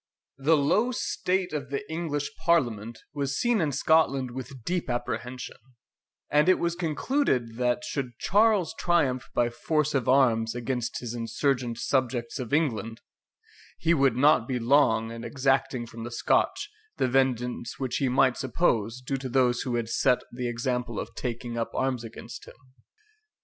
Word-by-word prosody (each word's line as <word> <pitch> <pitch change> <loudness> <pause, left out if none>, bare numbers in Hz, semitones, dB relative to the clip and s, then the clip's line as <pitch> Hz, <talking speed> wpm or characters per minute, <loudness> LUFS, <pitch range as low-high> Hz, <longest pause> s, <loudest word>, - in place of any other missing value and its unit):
The 155 +4 +4
low 200 - +2
state 185 -7 -1
of 140 -3 -4
the 140 +10 -4
English 160 -3 -3
Parliament 120 -9 +1 0.2
was 140 -2 -2
seen 240 -4 +2
in 155 -3 +1
Scotland 140 -3 +2
with 130 0 -8
deep 175 -1 -2
apprehension; 120 +1 -4 0.7
and 150 +4 +4
it 185 - +5
was 170 0 0
concluded, 155 - 0
that 125 +4 0
should 130 -6 -4
Charles 205 -3 +3
triumph 130 -9 +1
by 120 0 +2
force 150 +4 0
of 130 -4 0
arms 120 -4 +3
against 120 -1 -3
his 120 -2 -5
insurgent 120 +1 -1
subjects 125 -2 -1
of 125 -3 -5
England, 115 -7 0 0.8
he 170 +1 +2
would 135 -6 +3
not 130 -4 +4
be 130 - -1
long 115 -3 +3
in 115 0 -7
exacting 135 -2 0
from 115 0 -9
the 120 - -5
Scotch 420 - 0 0.3
the - - +2
vengeance 125 -2 0
which 130 -2 -2
he 135 -3 +1
might 130 0 +3
suppose 120 -4 0
due 135 +2 -2
to 130 0 -5
those 125 -1 +2
who 125 -3 -2
had 115 -1 -1
set 125 +2 +2
the 125 0 -3
example 120 -1 -2
of - - -6
taking 120 -1 -4
up 115 - -1
arms 130 -3 0
against 115 0 -9
him. - - -13
130 Hz, 160 wpm, -27 LUFS, 120-150 Hz, 0.8 s, it